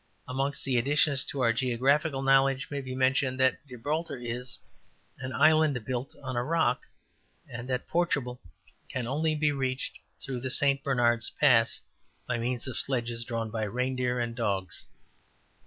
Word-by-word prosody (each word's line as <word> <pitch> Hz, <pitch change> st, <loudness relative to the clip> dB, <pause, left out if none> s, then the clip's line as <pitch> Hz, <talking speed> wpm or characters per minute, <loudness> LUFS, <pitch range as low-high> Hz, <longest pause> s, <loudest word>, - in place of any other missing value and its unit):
'' -, -, -39 dB
Amongst 135 Hz, +2 st, -2 dB
the 130 Hz, -2 st, +1 dB
additions 140 Hz, +2 st, +3 dB
to 140 Hz, -, -3 dB
our 115 Hz, -2 st, +4 dB
geographical 135 Hz, +4 st, +1 dB
knowledge 135 Hz, 0 st, +3 dB
may 140 Hz, -1 st, -2 dB
be 130 Hz, -1 st, -6 dB
mentioned 130 Hz, 0 st, +2 dB
that 130 Hz, -1 st, +3 dB
Gibraltar 145 Hz, +7 st, -3 dB
is 125 Hz, +1 st, -4 dB, 0.7 s
``an 130 Hz, -, -3 dB
island 155 Hz, -3 st, +4 dB
built 130 Hz, +1 st, -3 dB
on 130 Hz, -1 st, -4 dB
a 120 Hz, -, +1 dB
rock,'' 155 Hz, -3 st, +1 dB, 0.6 s
and 120 Hz, +2 st, -7 dB
that 125 Hz, -1 st, -2 dB
Portugal 140 Hz, -8 st, 0 dB, 0.5 s
can 130 Hz, -2 st, -3 dB
only 155 Hz, +5 st, 0 dB
be 150 Hz, 0 st, +2 dB
reached 130 Hz, -2 st, -2 dB, 0.2 s
through 130 Hz, -2 st, -4 dB
the 130 Hz, +1 st, -3 dB
St. 140 Hz, +1 st, +3 dB
Bernard's 120 Hz, -6 st, +2 dB
Pass 120 Hz, -6 st, +3 dB, 0.5 s
``by 120 Hz, -, -1 dB
means 120 Hz, +2 st, -2 dB
of 130 Hz, -, -4 dB
sledges 120 Hz, -3 st, -1 dB
drawn 115 Hz, -2 st, -3 dB
by 110 Hz, 0 st, -2 dB
reindeer 125 Hz, +3 st, -1 dB
and 120 Hz, -1 st, -2 dB
dogs.'' 100 Hz, -5 st, -2 dB
130 Hz, 155 wpm, -29 LUFS, 120-140 Hz, 0.7 s, our